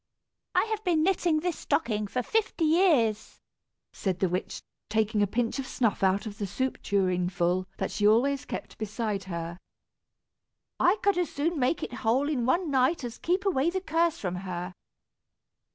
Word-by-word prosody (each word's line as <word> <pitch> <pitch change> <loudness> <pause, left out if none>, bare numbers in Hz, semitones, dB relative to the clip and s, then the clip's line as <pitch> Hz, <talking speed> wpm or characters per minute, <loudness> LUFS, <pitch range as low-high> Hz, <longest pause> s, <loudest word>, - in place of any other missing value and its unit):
"I - - +5
have 435 0 -2
been 335 -4 +2
knitting 345 -4 +2
this 355 -1 -2
stocking 215 -8 0
for 250 +5 -2
fifty 430 - 0
years," 305 - +2 0.5
said 190 -3 -2
the 190 - +1
witch, 180 +2 -3 0.3
taking 215 0 +1
a 205 - +3
pinch 230 +5 -1
of 265 - -4
snuff 230 -7 0
out 195 +2 +2
of 205 -2 -7
the 205 - -2
soup 260 +7 -2
tureenful 185 -1 0
that 195 - -2
she 205 -1 +2
always 270 +6 +3
kept - - -7
beside 210 -2 -3
her. 170 -1 -5 1.2
"I 360 +4 +4
could 400 -3 +3
as 350 - 0
soon 315 +2 -1
make 260 +5 +1
it - - -5
whole 255 +5 +2
in 250 -6 0
one 335 +3 +1
night 265 +3 +2
as 240 0 -6
keep 370 +4 0
away 330 -5 +2
the 375 +2 -1
curse 335 -2 +1
from 180 -2 -3
her." 180 -1 -5
240 Hz, 170 wpm, -28 LUFS, 200-325 Hz, 1.2 s, I